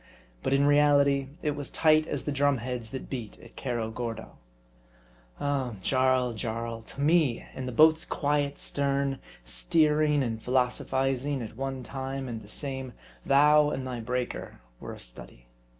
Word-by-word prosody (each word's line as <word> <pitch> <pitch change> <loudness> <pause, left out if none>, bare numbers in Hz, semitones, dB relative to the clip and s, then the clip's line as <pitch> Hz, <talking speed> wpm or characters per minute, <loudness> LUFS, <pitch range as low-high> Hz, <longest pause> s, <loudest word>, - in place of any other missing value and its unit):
But - - -1
in 140 +1 +4
reality 140 -1 +4 0.2
it 150 - +1
was 145 -2 -5
tight 155 0 +3
as 145 - -3
the 150 - -1
drum 140 0 +2
heads 120 -1 -5
that 130 - -6
beat 120 -5 -6
at 115 - -15
Cerro 120 -4 -2
Gordo. 115 -1 -5 1.1
Oh! 135 -5 -1
Jarl, 130 -2 +2
Jarl: 115 +1 -4
to 125 +5 -9
me 150 -5 +3
in 130 -1 -5
the - - -3
boat's 155 +5 +5
quiet 145 -1 0
stern, 140 -1 -1 0.2
steering 150 - +2
and 115 -2 -3
philosophizing 130 +2 0
at 110 - -8
one 135 0 -4
time 135 +1 -5
and 115 -2 -5
the 105 - -14
same, 130 -1 -4 0.3
thou 150 +2 +6
and 135 -2 -3
thy 125 -2 -4
breaker 125 +2 -4 0.2
were - - -7
a - - -11
study. - - -11
135 Hz, 155 wpm, -28 LUFS, 120-145 Hz, 1.1 s, thou